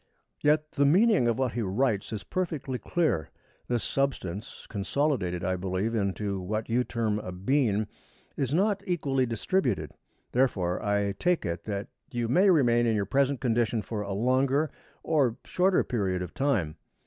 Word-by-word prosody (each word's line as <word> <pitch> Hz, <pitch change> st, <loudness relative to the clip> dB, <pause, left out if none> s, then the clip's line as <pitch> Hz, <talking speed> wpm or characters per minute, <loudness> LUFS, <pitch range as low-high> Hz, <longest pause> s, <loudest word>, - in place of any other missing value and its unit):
Yet 150 Hz, +1 st, +2 dB
the 145 Hz, -, +1 dB
meaning 185 Hz, -, +4 dB
of 115 Hz, -1 st, +1 dB
what 130 Hz, -3 st, 0 dB
he 120 Hz, -, -2 dB
writes 105 Hz, +1 st, 0 dB
is 110 Hz, -2 st, -4 dB
perfectly 150 Hz, -8 st, -3 dB
clear. 150 Hz, -, 0 dB, 0.4 s
This 120 Hz, -2 st, 0 dB
substance, 120 Hz, -7 st, -3 dB
consolidated, 100 Hz, -, -1 dB
I 95 Hz, -1 st, 0 dB
believe, 95 Hz, +4 st, -2 dB
into 100 Hz, -2 st, -1 dB
what 110 Hz, +5 st, -3 dB
you 120 Hz, +2 st, +2 dB
term 110 Hz, -4 st, -1 dB
a 90 Hz, -, -6 dB
bean, 105 Hz, +2 st, +1 dB, 0.5 s
is 135 Hz, -3 st, -1 dB
not 195 Hz, +5 st, +2 dB
equally 140 Hz, -7 st, +1 dB
distributed. 120 Hz, -, 0 dB, 0.4 s
Therefore, 95 Hz, -9 st, +1 dB
I 100 Hz, -1 st, +1 dB
take 180 Hz, -1 st, +1 dB
it 85 Hz, 0 st, -3 dB
that 100 Hz, -1 st, -3 dB, 0.2 s
you 120 Hz, -2 st, -1 dB
may 185 Hz, -, +4 dB
remain 120 Hz, -8 st, +4 dB
in 115 Hz, -, +2 dB
your 100 Hz, -1 st, 0 dB
present 135 Hz, +4 st, +1 dB
condition 115 Hz, -3 st, +1 dB
for 110 Hz, -3 st, -4 dB
a 100 Hz, -1 st, -4 dB
longer 130 Hz, +7 st, +2 dB, 0.3 s
or 135 Hz, -7 st, +2 dB
shorter 185 Hz, +1 st, +2 dB
period 95 Hz, -7 st, -1 dB
of 85 Hz, -, -8 dB
time. 105 Hz, -, 0 dB
120 Hz, 160 wpm, -28 LUFS, 100-140 Hz, 0.5 s, meaning